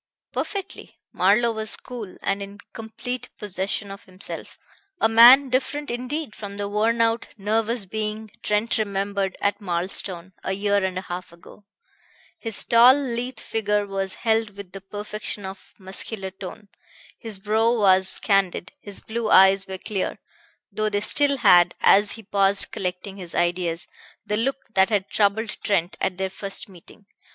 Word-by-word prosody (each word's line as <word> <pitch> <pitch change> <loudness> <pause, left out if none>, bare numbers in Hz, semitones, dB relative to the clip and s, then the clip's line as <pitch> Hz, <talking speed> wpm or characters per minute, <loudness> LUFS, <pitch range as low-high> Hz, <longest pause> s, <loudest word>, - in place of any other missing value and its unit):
"Perfectly." 395 -2 -5 0.2
Marlowe 215 +6 +3
was 220 -1 -4
cool 230 -7 -8
and 195 0 0
in 200 +1 -8 0.2
complete 225 +3 -6
possession 200 0 -3
of 195 - -10
himself, 185 +1 -8 0.4
a - - +4
man 245 +5 +8
different 275 +3 -1
indeed 255 +2 -4
from 200 -1 -7
the 205 0 -2
worn 220 +3 +1
out, 230 0 +1
nervous 220 +2 0
being 215 +1 -3
Trent 210 +2 0
remembered 200 -2 -1
at 200 +2 0
Marlstone 185 0 0
a 190 - -1
year 200 0 +1
and 185 -1 -1
a - - -2
half 180 -1 -6
ago. 170 +4 -16 0.7
His 225 -3 -3
tall, 240 +3 +7
lithe 250 -3 -3
figure 210 -2 -1
was 195 -1 -3
held 220 -2 0
with 200 -3 -9
the 195 - -9
perfection 205 +1 -6
of 190 0 -10
muscular 190 +1 -6
tone. 195 +2 -10 0.5
His 225 -4 -5
brow 215 +3 +2
was 190 -4 +3
candid, 195 -4 +1
his 205 -1 -8
blue 225 0 -3
eyes 195 0 +6
were 190 0 -5
clear, 195 0 -3 0.5
though 215 0 -1
they 205 -1 -1
still 280 +6 +2
had, 175 -7 +5
as 205 +1 +5
he 225 - -10
paused 195 0 +2
collecting 185 +1 -4
his 180 -3 -8
ideas, 175 -1 0 0.4
the 210 - -1
look 265 +5 0 0.2
that 190 +1 +4
had 205 -3 0
troubled 215 +1 +1
Trent 185 -3 0
at 180 - -1
their 190 0 -2
first 195 +4 -4
meeting. 195 +2 -16
205 Hz, 155 wpm, -24 LUFS, 190-225 Hz, 0.7 s, man